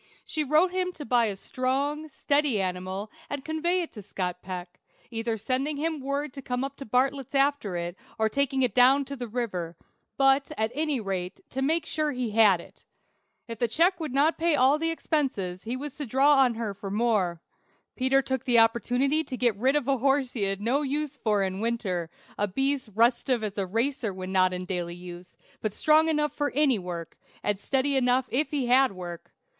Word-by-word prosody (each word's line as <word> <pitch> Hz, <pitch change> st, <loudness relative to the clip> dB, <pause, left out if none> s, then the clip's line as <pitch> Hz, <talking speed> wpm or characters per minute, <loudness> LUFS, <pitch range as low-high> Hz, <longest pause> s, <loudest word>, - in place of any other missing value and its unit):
She 310 Hz, -, -1 dB
wrote 310 Hz, +6 st, +3 dB
him 365 Hz, 0 st, -1 dB
to 295 Hz, -, -8 dB
buy 240 Hz, 0 st, +3 dB
a 205 Hz, -3 st, -2 dB
strong, 275 Hz, +8 st, -2 dB
steady 285 Hz, -5 st, +1 dB
animal, 185 Hz, +2 st, -3 dB, 0.2 s
and 285 Hz, -1 st, -5 dB
convey 345 Hz, +3 st, 0 dB
it 330 Hz, -, -8 dB
to 210 Hz, -, -9 dB
Scott 180 Hz, -2 st, -4 dB
Peck, 180 Hz, -1 st, -7 dB, 0.3 s
either 225 Hz, 0 st, -2 dB
sending 270 Hz, +7 st, -1 dB
him 315 Hz, +1 st, -2 dB
word 280 Hz, +1 st, -3 dB
to 275 Hz, -, -7 dB
come 250 Hz, 0 st, -2 dB
up 275 Hz, 0 st, -4 dB
to 275 Hz, -, -8 dB
Bartlett's 265 Hz, +3 st, 0 dB
after 275 Hz, -9 st, +1 dB
it, 175 Hz, +1 st, -4 dB, 0.2 s
or 220 Hz, -, +2 dB
taking 270 Hz, +3 st, +1 dB
it 245 Hz, -5 st, +1 dB
down 260 Hz, +3 st, +5 dB
the 265 Hz, -3 st, -6 dB
river; 185 Hz, -8 st, -4 dB, 0.4 s
but, 270 Hz, +1 st, +3 dB
at 220 Hz, +1 st, 0 dB
any 300 Hz, -1 st, 0 dB
rate, 190 Hz, -4 st, -4 dB
to 265 Hz, -, -3 dB
make 320 Hz, +5 st, +1 dB
sure 305 Hz, -1 st, -1 dB
he 250 Hz, -3 st, -2 dB
had 210 Hz, -4 st, +5 dB
it. -, -, -15 dB, 0.6 s
If 230 Hz, -1 st, -7 dB
the 240 Hz, -, +2 dB
check 345 Hz, -, +2 dB
would 310 Hz, -4 st, -4 dB
not 290 Hz, +5 st, +2 dB
pay 335 Hz, -1 st, +3 dB
all 275 Hz, +4 st, +4 dB
expenses, 275 Hz, -, -1 dB
he 240 Hz, +3 st, -3 dB
was 285 Hz, 0 st, -6 dB
to 295 Hz, -3 st, -4 dB
draw 270 Hz, +5 st, +4 dB
on 250 Hz, -3 st, +4 dB
her 220 Hz, -3 st, -3 dB
for 195 Hz, 0 st, -7 dB
more. 205 Hz, -5 st, +1 dB, 0.6 s
Peter 270 Hz, +1 st, +2 dB
took 265 Hz, -1 st, -2 dB
the 245 Hz, -2 st, +3 dB
opportunity 245 Hz, +6 st, +3 dB
to 255 Hz, -, -5 dB
get 240 Hz, -4 st, +2 dB
rid 260 Hz, +7 st, +2 dB
of 290 Hz, -3 st, 0 dB
a 275 Hz, -2 st, +2 dB
horse 270 Hz, 0 st, +1 dB
he 230 Hz, -, -4 dB
had 195 Hz, 0 st, -1 dB
no 250 Hz, +7 st, +1 dB
use 295 Hz, +1 st, -2 dB
for 215 Hz, -6 st, +1 dB
in 190 Hz, 0 st, -2 dB
winter; 205 Hz, -7 st, -2 dB, 0.3 s
a 205 Hz, -, +2 dB
beast 270 Hz, +4 st, -1 dB
restive 235 Hz, +1 st, +2 dB
as 205 Hz, -2 st, -3 dB
a 195 Hz, -, -1 dB
racer 230 Hz, +3 st, -1 dB
when 185 Hz, 0 st, -6 dB
not 185 Hz, -1 st, +3 dB
in 180 Hz, 0 st, -4 dB
daily 175 Hz, -2 st, -3 dB
use, 175 Hz, 0 st, -11 dB, 0.2 s
but 215 Hz, -2 st, -2 dB
strong 310 Hz, +1 st, +4 dB
enough 300 Hz, -1 st, 0 dB
for 290 Hz, -1 st, -1 dB
any 275 Hz, -6 st, +3 dB
work, 175 Hz, -2 st, -7 dB, 0.3 s
and 205 Hz, -2 st, 0 dB
steady 275 Hz, +4 st, +1 dB
enough 255 Hz, 0 st, +3 dB
if 295 Hz, +5 st, +1 dB
he 285 Hz, -4 st, -1 dB
had 255 Hz, +2 st, +4 dB
work. 175 Hz, -2 st, -8 dB
250 Hz, 200 wpm, -27 LUFS, 205-285 Hz, 0.6 s, down